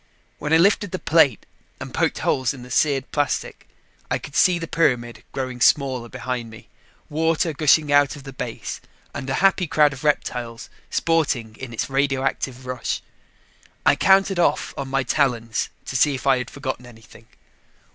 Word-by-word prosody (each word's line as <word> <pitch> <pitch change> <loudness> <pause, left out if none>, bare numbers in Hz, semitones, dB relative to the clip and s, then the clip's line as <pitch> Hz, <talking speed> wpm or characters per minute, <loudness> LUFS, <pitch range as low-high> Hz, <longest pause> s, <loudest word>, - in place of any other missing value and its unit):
When 150 - -4
I 160 - +7
lifted 200 +3 +3
the 185 - -3
plate 150 - +3 0.3
and - - -8
poked - - 0
holes 130 +1 +1
in 125 - -11
the 125 - -12
seared 135 0 +1
plastic, 145 -2 -2 0.4
I - - +1
could 140 - -11
see 180 -1 +4
the 165 -1 -5
pyramid 125 -8 0
growing 130 -2 -4
smaller 130 -4 +2
behind 125 -1 -4
me, 110 -1 -14 0.4
water 160 +1 0
gushing 150 0 +3
out 145 -1 +4
of 145 - -11
the 135 0 -9
base 125 -3 -6 0.3
and 130 - -5
a 135 - 0
happy 190 -2 +3
crowd 150 -2 +3
of 135 +3 -10
reptiles 125 -5 -2 0.2
sporting 140 -9 0
in 130 -2 -7
its 115 - -3
radioactive 135 -1 -1
rush. 125 0 -3 0.8
I - - +6
counted 195 -1 +3
off 170 - +1
on 140 - -4
my 135 0 0
talons 120 -4 0 0.2
to - - -6
see 140 +2 +3
if 130 - -7
I 135 -2 +4
had 125 - -5
forgotten 130 -3 -5
anything. 115 -1 -16
135 Hz, 170 wpm, -22 LUFS, 125-155 Hz, 0.8 s, I